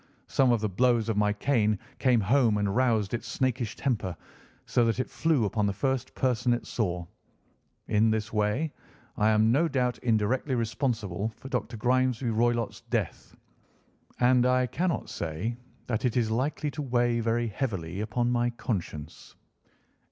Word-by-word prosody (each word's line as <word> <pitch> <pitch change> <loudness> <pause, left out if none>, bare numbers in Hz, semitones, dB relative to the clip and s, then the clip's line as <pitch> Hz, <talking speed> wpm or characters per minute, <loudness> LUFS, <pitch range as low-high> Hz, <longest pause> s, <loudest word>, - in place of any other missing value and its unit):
Some 130 -2 +3
of 115 -3 +2
the 110 - +1
blows 115 +2 +2
of 110 - +1
my 105 0 +2
cane 105 -1 +1 0.2
came 125 -3 +4
home 115 +1 +3
and 100 -1 0
roused 115 -5 +2
its 120 0 -3
snakish 125 -2 -1
temper, 105 -10 -2 0.5
so 120 - +2
that 115 +2 0
it 130 - 0
flew 155 -8 +2
upon 105 0 0
the 100 - 0
first 130 +4 -2
person 125 -1 +1
it 120 - -3
saw. 90 -6 -2 0.8
In 110 +1 +3
this 110 0 -1
way 110 +9 0 0.4
I 105 +1 +3
am 110 +1 +4
no 155 +7 +3
doubt 125 -4 0
indirectly 125 +4 +1
responsible 110 - -1
for 135 - -10
Dr. 125 -3 -3
Grimesby 125 +1 +1
Roylott's 120 +1 0
death, - - -3 0.8
and 125 0 +4
I 125 0 +3
cannot 170 +8 -1
say 85 +9 -3 0.3
that 115 -3 -2
it 125 -1 +1
is 115 -2 +1
likely 145 +5 -1
to 150 - -5
weigh 120 -3 +1
very 115 0 0
heavily 100 -6 -3
upon 120 +3 0
my 120 0 +2
conscience." 85 -9 -5
120 Hz, 160 wpm, -28 LUFS, 105-125 Hz, 0.8 s, came